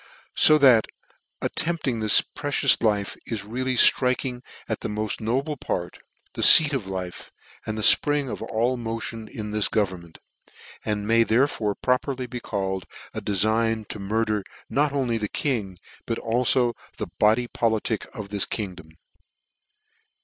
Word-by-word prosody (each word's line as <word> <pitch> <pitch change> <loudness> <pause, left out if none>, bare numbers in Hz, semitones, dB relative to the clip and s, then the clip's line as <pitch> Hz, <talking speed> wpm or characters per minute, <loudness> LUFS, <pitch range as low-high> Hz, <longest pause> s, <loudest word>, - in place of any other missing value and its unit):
" - - -37
So 155 - +7
that 130 -6 +5 0.6
attempting 155 -8 -2
this 110 -1 +6
precious 145 -2 0
life, 105 -3 0
is 110 -4 -4
really 130 +4 -3
ftriking 125 0 +4 0.3
at - - -3
the - - -5
moft 105 0 -4
noble 135 +7 -2
part, 90 -7 -5 0.3
the - - -5
feat 155 -2 +9
of 120 -8 -3
life, 95 -2 -7 0.4
and 110 0 -4
fpring 145 +6 +3
of - - -6
all 120 +3 -1
motion 115 -1 -5
in 105 -1 -7
this 105 -1 +1
government; 90 -6 -3 0.7
and 105 -1 -3
may 115 +1 +4
therefore 115 -3 +1
properly 125 0 -1
be 125 0 -7
called 95 -5 -4 0.3
a - - -5
defign 110 +2 0
to 105 - -6
murder 105 +1 -1 0.3
not 145 +1 +1
only 125 -5 -1
the 105 -2 -3
king, 105 -10 -3 0.3
but 115 - -2
alib 120 +1 +1 0.2
the - - -4
body 110 +3 +3
politick 110 -2 -2
of 105 -6 -8
this 100 -1 0
kingdom. 90 -7 -6
115 Hz, 145 wpm, -24 LUFS, 105-125 Hz, 0.7 s, feat